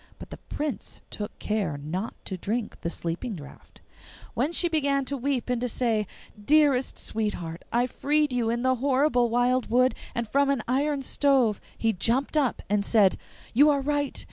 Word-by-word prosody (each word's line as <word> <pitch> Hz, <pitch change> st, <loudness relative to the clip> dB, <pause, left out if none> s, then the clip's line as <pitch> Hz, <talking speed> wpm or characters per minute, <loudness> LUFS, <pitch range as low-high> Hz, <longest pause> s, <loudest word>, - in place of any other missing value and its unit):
But -, -, -11 dB
the -, -, -7 dB
Prince 295 Hz, -6 st, -4 dB
took 210 Hz, -1 st, -6 dB
care 200 Hz, -9 st, -1 dB
not 175 Hz, +9 st, -4 dB
to 190 Hz, -, -4 dB
drink 215 Hz, +5 st, -3 dB
the 170 Hz, -, -2 dB
sleeping 175 Hz, +8 st, -4 dB
draught. 145 Hz, -4 st, -13 dB, 0.5 s
When 300 Hz, -, 0 dB
she 345 Hz, 0 st, +1 dB
began 280 Hz, -4 st, +1 dB
to 280 Hz, -, -2 dB
weep 270 Hz, -1 st, -1 dB
and 250 Hz, -1 st, -1 dB
to 250 Hz, -, -1 dB
say, 220 Hz, -3 st, 0 dB, 0.4 s
'Dearest 285 Hz, -1 st, +3 dB
sweetheart, 180 Hz, -7 st, -3 dB
I 240 Hz, +1 st, +2 dB
freed 295 Hz, +2 st, 0 dB
you 240 Hz, -2 st, +1 dB
in 235 Hz, +1 st, -1 dB
the 260 Hz, 0 st, +2 dB
horrible 260 Hz, -1 st, +2 dB
wild 245 Hz, +1 st, +1 dB
wood, 255 Hz, +3 st, +4 dB, 0.2 s
and 235 Hz, -1 st, -2 dB
from 280 Hz, +5 st, +2 dB
an 275 Hz, -5 st, +1 dB
iron 275 Hz, +2 st, 0 dB
stove,' 260 Hz, -6 st, +2 dB, 0.2 s
he 225 Hz, -1 st, +1 dB
jumped 245 Hz, -, 0 dB
up 280 Hz, -5 st, +1 dB
and 205 Hz, 0 st, +1 dB
said, 200 Hz, -3 st, +4 dB, 0.4 s
'You 290 Hz, +6 st, +6 dB
are 285 Hz, -2 st, +2 dB
right. 290 Hz, 0 st, -1 dB
250 Hz, 175 wpm, -26 LUFS, 215-280 Hz, 0.5 s, You